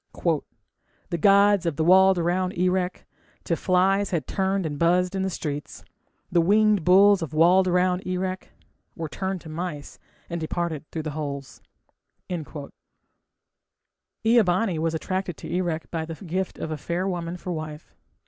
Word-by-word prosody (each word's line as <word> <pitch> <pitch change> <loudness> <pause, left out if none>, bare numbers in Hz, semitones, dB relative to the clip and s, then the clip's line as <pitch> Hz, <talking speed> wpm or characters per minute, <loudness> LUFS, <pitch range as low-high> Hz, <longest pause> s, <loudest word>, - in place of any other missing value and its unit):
The 170 - 0
gods 200 -1 +5
of 160 -2 -2
walled 190 +3 +6
round 180 +2 0
Erech 180 0 0 0.4
To 170 - 0
flies 190 +3 +2
had 170 -4 -1
turned 190 -1 -1
and 145 -2 -4
buzzed 180 +2 +2
in 190 - -1
the 190 - 0
streets; 150 -5 -6 0.5
The 175 - +4
winged 210 +1 +3
bulls 195 +2 +6
of 160 -1 -5
walled 180 +4 +5
round 180 +1 +1
Erech 185 0 -3 0.5
Were 165 -2 -4
turned 190 +3 -4
to 160 - -11
mice 155 -2 -6 0.3
and 170 -1 -4
departed 160 -1 -3
through 160 - -5
the 155 - -4
holes. 140 -3 -6 2.6
Ea 230 +1 +5
bani 185 -2 0
was 165 0 0
attracted 185 +1 -3
to - - -9
Erech 170 -3 -2
by 160 -1 -2
the 165 0 -6
gift 185 +1 -4
of 160 - -5
a 155 - -3
fair 175 +5 -2
woman 175 -2 -3
for 180 - -6
wife. 155 -1 -7
180 Hz, 150 wpm, -25 LUFS, 160-190 Hz, 2.6 s, walled